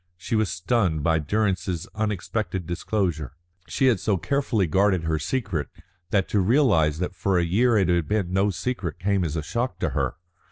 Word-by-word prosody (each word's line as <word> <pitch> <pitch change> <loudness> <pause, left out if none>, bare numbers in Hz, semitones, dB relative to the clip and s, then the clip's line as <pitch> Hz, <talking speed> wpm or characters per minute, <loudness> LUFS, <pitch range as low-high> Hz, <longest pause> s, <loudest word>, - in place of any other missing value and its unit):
She 95 +6 -3
was 110 -2 +2
stunned 90 -5 0
by 80 0 +2
Durrance's 90 0 -1
unexpected 105 -3 -2
disclosure. 85 - -2 0.3
She 135 - 0
had 120 -7 +4
so 100 0 +1
carefully 110 - 0
guarded 95 +1 +2
her 80 -1 0
secret, 80 - -2 0.4
that 95 0 +1
to 105 - +2
realise 95 - +3
that 90 +2 -3
for 95 +1 +1
a 85 - +3
year 115 +7 +3
it 95 -4 +3
had 85 -3 +1
been 100 -3 -1
no 95 +2 +3
secret 90 -2 -3
came 100 0 0
as 80 -2 -2
a 80 - -2
shock 115 - -2
to - - -1
her. - - -1
95 Hz, 185 wpm, -25 LUFS, 85-110 Hz, 0.4 s, had